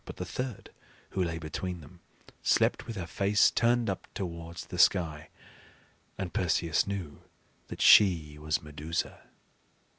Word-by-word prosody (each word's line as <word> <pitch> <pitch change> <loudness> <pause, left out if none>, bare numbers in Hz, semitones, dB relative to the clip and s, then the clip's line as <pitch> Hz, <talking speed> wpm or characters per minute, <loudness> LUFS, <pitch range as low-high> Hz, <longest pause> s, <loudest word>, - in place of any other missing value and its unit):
But - - -9
the - - -4
third, 125 -4 -5 0.4
who 95 - 0
lay 85 -2 -2
between 85 +3 -5
them, 80 +5 -15 0.4
slept - - +2
with 115 - -5
her 95 -3 -4
face 100 +4 +3
turned 120 0 +2
up 95 -2 -4
towards 85 -2 -6
the - - -7
sky; 80 -4 +2 0.9
and 95 -3 -4
Perseus 85 -2 +1
knew 95 -7 -5 0.5
that - - -4
she 80 -7 +6
was 75 0 -1
Medusa. 75 +2 -4
85 Hz, 140 wpm, -29 LUFS, 80-100 Hz, 0.9 s, she